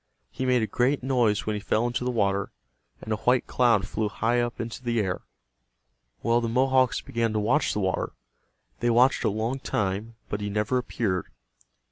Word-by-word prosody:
He 130 - -3
made 125 -2 +3
a - - +2
great 125 +5 +1
noise 120 -6 +2
when 110 - -1
he 105 - -2
fell 110 +3 0
into 120 0 -1
the 125 - 0
water, 100 -4 0 0.5
and 110 - -2
a - - -1
white 125 +5 +2
cloud 115 -6 +2
flew 105 -1 -1
high 120 +3 +1
up 120 0 -3
into 115 +2 -5
the 120 -2 0
air. 95 -4 -1 1.0
Well, 120 +1 +3
the 115 - -1
Mohawks 130 +1 +3
began 115 -1 -1
to 110 - +1
watch 125 +9 +2
the 105 - -1
water. 95 -1 -1 0.7
They 120 - +1
watched 125 +3 +4
a - - +3
long 110 +6 -2
time, 105 0 -2
but 105 - -3
he 105 - -2
never 105 +5 0
appeared. 100 -7 -2
115 Hz, 190 wpm, -26 LUFS, 105-125 Hz, 1.0 s, watched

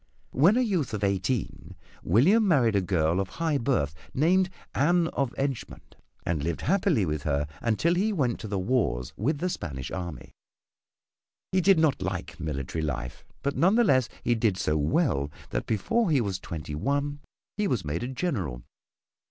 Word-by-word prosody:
When 175 - +4
a - - +4
youth 180 - 0
of 105 - -4
eighteen 100 +3 -1 0.3
William 185 - +4
married 125 - +3
a 100 - +3
girl 85 -2 +1
of 95 -1 -2
high 160 -4 +1
birth 115 - 0 0.2
named 180 +6 +3 0.2
Anne 170 +4 +3
of 135 -3 -1
Edgemont 135 -3 -4 0.3
and 80 -4 -1
lived 85 +1 -2
happily 180 - +2
with 75 -2 -2
her 70 -1 0 0.2
until 120 +9 +2
he 200 +5 +1
went 135 - 0
to 110 - -6
the 100 -1 -2
wars 95 - 0
with 145 +9 0
the 180 - -1
Spanish 70 - -5
army. 85 -9 -6 1.2
He 185 0 +3
did 195 0 +5
not 155 -8 +2
like 95 -1 -4
military 75 0 -3
life, 60 -5 -4 0.2
but 140 0 -1
none 190 +5 +4
the 240 - +5
less 130 - +3
he 120 - +2
did 110 -4 +1
so 75 -5 0
well 75 - +1 0.2
that - - -2
before 195 - +1
he 150 -4 +3
was 100 -5 -2
twenty 80 -4 -6
one 140 - -1 0.4
he 210 0 0
was 115 - -1
made 75 +3 -2
a 120 - -2
General. 110 - -3
120 Hz, 175 wpm, -27 LUFS, -, 1.2 s, did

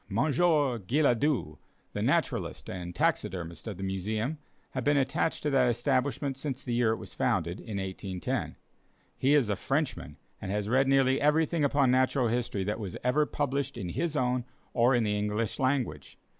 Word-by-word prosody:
Monsieur 145 - +2
Guillaudeu, 125 - +1 0.4
the - - -3
naturalist - - -1
and 90 -1 -6
taxidermist 85 +1 -1
of 105 -5 -5
the 95 - -6
Museum, 110 - -2 0.3
had 130 - -3
been 145 +2 +3
attached 140 +5 0
to 150 - 0
that 130 -2 +4
establishment 130 +2 0
since 135 -2 -4
the 120 - -3
year 120 -1 +3
it 110 - -1
was - - -9
founded, 95 -6 0
in 110 -4 -6
1810. 95 -2 -3 0.6
He 140 +3 +3
is 140 -6 +3
a 105 - 0
Frenchman, 135 +9 -2 0.2
and 95 - -5
has 105 0 -1
read 130 +3 +3
nearly 135 -1 +3
everything 155 +2 +2
upon 140 -2 +3
natural 130 -1 +2
history 115 -4 -1
that 105 +4 -2
was 100 -5 -5
ever 145 +4 +2
published 140 -2 -2
in 90 - -4
his 160 - -2
own 125 -2 +1 0.3
or 125 +1 +4
in 120 - +2
the 105 -1 0
English 105 +1 -1
language. 130 - -1
125 Hz, 170 wpm, -29 LUFS, 105-140 Hz, 0.6 s, that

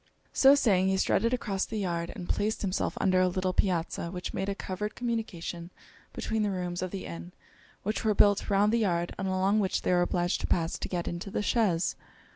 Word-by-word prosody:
So 275 +1 +7
saying, 195 -9 +3
he 190 0 +2
strutted 230 +4 +2
across 200 -6 -1
the 220 - -4
yard, 170 -4 -2
and 180 -4 -7
placed 215 +1 -1
himself 190 -1 -1
under 185 -1 +3
a 185 - +4
little 185 0 -1
piazza 170 -2 0
which 180 0 -5
made 195 +1 -2
a 200 - -2
covered 205 +2 -4
communication 200 -8 -4 0.4
between 220 -1 -2
the 210 - +1
rooms 180 -2 -3
of 185 - -2
the 195 +1 -6
inn 85 +1 -8 0.5
which 215 +2 -2
were 215 -2 +2
built 205 0 +4
round 205 +2 +3
the - - +4
yard, 175 -5 0
and 195 - -1
along 190 +3 +2
which 195 -3 0
they - - +1
were 175 -1 +4
obliged 175 0 0
to - - -2
pass 165 -1 0
to - - -3
get 175 -2 -2
into 175 +3 -4
the 210 - -2
chaise. 200 -7 +1
190 Hz, 215 wpm, -29 LUFS, 175-210 Hz, 0.5 s, So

